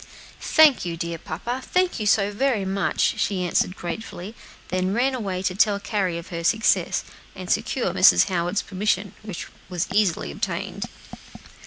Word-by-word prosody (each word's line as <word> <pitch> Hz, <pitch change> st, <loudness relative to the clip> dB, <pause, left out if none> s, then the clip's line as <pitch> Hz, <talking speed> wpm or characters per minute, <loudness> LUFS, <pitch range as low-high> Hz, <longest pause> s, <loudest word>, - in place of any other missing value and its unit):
"Thank 310 Hz, -4 st, +5 dB
you, 170 Hz, -1 st, -4 dB
dear 170 Hz, 0 st, -4 dB
papa, 235 Hz, +14 st, -4 dB
thank 365 Hz, -6 st, 0 dB
you 210 Hz, -, -1 dB
so 205 Hz, -1 st, +3 dB
very 215 Hz, -2 st, 0 dB
much," 195 Hz, 0 st, 0 dB
she 190 Hz, -2 st, 0 dB
answered 180 Hz, +1 st, +1 dB
gratefully, 185 Hz, +2 st, -6 dB, 0.4 s
and 185 Hz, 0 st, 0 dB
then 195 Hz, -, -1 dB
ran 260 Hz, +3 st, +2 dB
away 195 Hz, -7 st, -3 dB
to 185 Hz, -, 0 dB
tell 205 Hz, +1 st, +3 dB
Carry 200 Hz, -5 st, -1 dB
of 170 Hz, -, -8 dB
her 170 Hz, -1 st, -5 dB
success, 220 Hz, +6 st, +2 dB, 0.3 s
and -, -, -5 dB
secure -, -, 0 dB
Mrs. -, -, +6 dB
Howard's 180 Hz, +1 st, -1 dB
permission, 195 Hz, 0 st, -1 dB
which 205 Hz, -5 st, -6 dB, 0.2 s
was 180 Hz, -2 st, -2 dB
easily 195 Hz, -, +1 dB
obtained. -, -, -3 dB
195 Hz, 160 wpm, -24 LUFS, 180-215 Hz, 0.4 s, Mrs